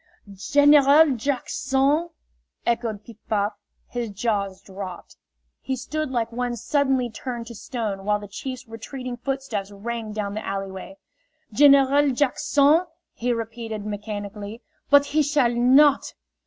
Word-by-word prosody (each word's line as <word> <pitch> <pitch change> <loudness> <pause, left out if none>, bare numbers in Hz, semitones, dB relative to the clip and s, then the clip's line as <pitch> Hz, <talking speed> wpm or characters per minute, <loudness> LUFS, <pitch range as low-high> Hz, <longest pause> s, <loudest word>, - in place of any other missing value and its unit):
"Gen 285 +9 +4
e - - +9
ral 285 +2 +6
Jackson!" 275 +4 0 0.6
echoed 230 -3 -1
Piff 230 -3 -13
Paff. 205 0 +1 0.3
His 240 -2 -4
jaws 200 -2 -2
dropped. 190 -2 -9 0.4
He 265 - -3
stood 305 +4 -3
like 235 -3 -1
one 245 0 -2
suddenly 265 0 +1
turned 240 +1 -6
to 235 - -9
stone 215 -3 -4
while 210 +1 +1
the 205 0 -9
chief's 255 +5 -7
retreating 245 +3 -7
footsteps 250 -6 -3
rang 220 +2 -5
down 210 -1 -3
the 215 +1 -4
alleyway. 195 0 -5 0.6
"General 280 +2 +5
Jack 260 0 0
son!" 300 +5 +4 0.3
he 245 +1 -2
repeated, 225 -2 -4
mechanically. 210 +1 -6 0.3
"But 285 0 +6
he 295 +2 +1
shall 285 -5 +2
not!" 265 +4 +4
240 Hz, 135 wpm, -24 LUFS, 210-275 Hz, 0.6 s, e